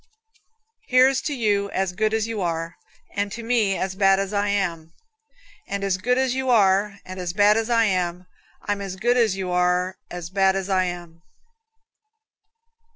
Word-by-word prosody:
Here's 255 0 +4
to 300 - -3
you 205 -4 0
as 190 -2 -2
good 215 +3 0
as 220 -1 0
you 225 -2 -4
are, 165 -1 -3 0.4
And 200 0 -2
to 235 - -7
me 225 -5 +1
as 190 0 -2
bad 195 0 +3
as 195 +1 -3
I 205 0 0
am; 170 -5 -2 0.7
And 200 0 -4
as 195 -2 0
good 250 +6 +1
as 260 -1 +1
you 260 0 -2
are 200 -2 +3
and 185 0 -8
as 175 -1 -4
bad 205 +2 +4
as 225 +1 -1
I 230 -1 +3
am, 180 -3 -1 0.4
I'm 205 -1 -2
as 195 -2 -5
good 240 +6 +1
as 225 -6 +2
you 190 -2 -4
are 180 +1 +1
as 175 -1 -7
bad 195 0 +2
as 195 0 -3
I 185 -1 +2
am. 175 -2 -7
195 Hz, 180 wpm, -23 LUFS, 185-220 Hz, 0.7 s, Here's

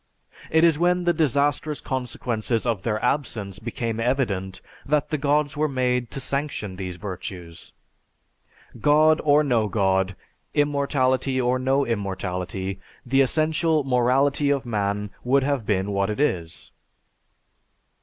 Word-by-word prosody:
It 160 +1 +3
is 165 -3 +4
when 180 +1 +2
the 175 0 +3
disastrous 145 0 +1
consequences 120 -3 -2
of 115 -6 0
their 110 0 -1
absence 115 -8 -2
became 115 0 -3
evident 105 -7 -1 0.2
that 150 +1 0
the 155 - +1
Gods 145 0 +1
were 155 +1 +1
made 125 -3 0
to - - -6
sanction 140 -9 -3
these 90 -1 -5
virtues. 90 -2 -8 1.1
God 155 +5 +4
or 150 0 +4
no 120 -6 +1
God, 95 -2 +1 0.4
immortality 140 -2 +1
or 125 0 +1
no 135 +2 +1
immortality, 95 -3 -3 0.3
the 135 +2 +3
essential 155 +2 +2
morality 135 +3 +2
of 140 -2 0
man 105 -2 -2
would 135 +2 +3
have 135 -5 -1
been 100 -1 0
what 100 0 0
it 105 - -3
is." 85 - -2
125 Hz, 130 wpm, -24 LUFS, 100-145 Hz, 1.1 s, is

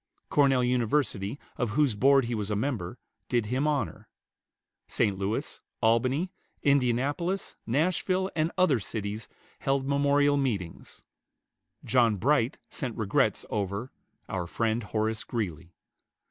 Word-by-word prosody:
Cornell 135 -3 +4
University, 125 -3 0 0.2
of 120 0 -1
whose 145 -6 +4
Board 135 +4 +4
he 120 - -2
was 105 -2 -2
a 105 - 0
member, 110 -4 -2 0.3
did 120 -3 +1
him 130 +7 0
honor. 145 -7 -1 0.8
St. 105 -4 +1
Louis, 100 +3 -3 0.2
Albany, 130 +10 +2 0.3
Indianapolis, 140 +7 +1
Nashville, 185 - +1
and 160 +1 +1
other 165 -9 +4
cities 105 +1 -4 0.3
held 135 0 0
memorial 145 0 +3
meetings. 105 -12 -3 0.8
John 120 -4 +4
Bright 125 +4 +2
sent 125 -5 -4
regrets 105 -4 +1
over 100 +5 -2 0.4
"our 90 -3 -3
friend, 115 +4 0
Horace 110 +1 -1
Greeley." 90 -7 -4
120 Hz, 120 wpm, -28 LUFS, 105-140 Hz, 0.8 s, Cornell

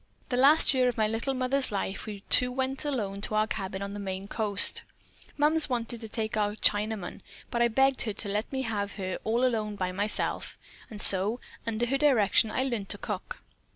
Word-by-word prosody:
"The 250 - -1
last 280 +4 +5
year 255 -1 +2
of 245 - -2
my 215 -1 +2
little 230 +5 -2
mother's 260 +1 +2
life 195 +1 -4
we 205 -2 -8
two 250 0 +5
went 265 +2 -1
alone 205 -9 -3
to 215 - -3
our 215 0 +3
cabin 195 -2 -5
on 200 0 -6
the 205 - -6
Maine 190 0 -5
coast. 205 -2 +2 0.6
Mums 300 +1 +5
wanted 235 -1 -2
to 225 - -4
take 220 0 -3
our 210 -1 -1
Chinaman, 210 -2 -1 0.3
but 235 - -1
I 240 - +5
begged 265 +3 +2
her 215 - -1
to 205 - -3
let 210 +3 -3
me 265 -1 -2
have 205 -4 -3
her 185 -2 -5
all 235 +3 +1
alone 215 -4 -1
by 185 -2 -3
myself, 205 +3 -2 0.3
and 215 - -9
so 205 +5 +3 0.3
under 230 +1 -1
her 270 +3 -1
direction 230 -7 +3
I 255 - -1
learned 235 -7 -3
to - - +2
cook. - - -6
220 Hz, 205 wpm, -27 LUFS, 205-255 Hz, 0.6 s, last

